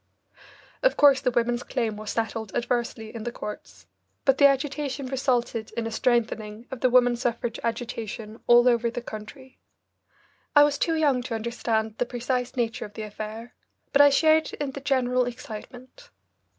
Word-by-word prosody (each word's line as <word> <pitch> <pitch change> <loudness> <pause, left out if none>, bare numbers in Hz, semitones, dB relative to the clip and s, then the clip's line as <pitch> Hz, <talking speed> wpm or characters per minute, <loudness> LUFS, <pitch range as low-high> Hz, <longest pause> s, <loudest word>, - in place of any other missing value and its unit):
Of - - +2
course 280 -2 +6
the 265 - +2
women's 240 0 0
claim 230 -5 -2
was 215 0 -7
settled 225 -2 -3
adversely 235 -2 -2
in 230 - -6
the 240 - -3
courts, 210 -2 -8 0.4
but 270 -1 +3
the 280 - +9
agitation 275 0 -1
resulted 245 -4 -1
in 230 - -1
a 225 - -3
strengthening 225 -2 -1
of 265 - -5
the 255 - +4
woman 245 -1 +4
suffrage 240 -1 -2
agitation 230 -2 -4
all 240 +1 +7
over 235 -1 +3
the 240 +1 -6
country. 250 +5 -10 1.0
I 290 - +9
was 290 -1 +1
too 330 - +1
young 285 -5 +2
to 245 -2 -4
understand 225 -1 -2
the 245 - 0
precise 250 +1 -2
nature 230 -2 -1
of 205 - -12
the 220 - -5
affair, 215 +2 -7 0.4
but 285 - +6
I 285 - +8
shared 315 +2 +3
in 285 -2 -3
the 275 - -8
general 255 -2 +1
excitement. 250 - -9
240 Hz, 165 wpm, -26 LUFS, 225-265 Hz, 1.0 s, the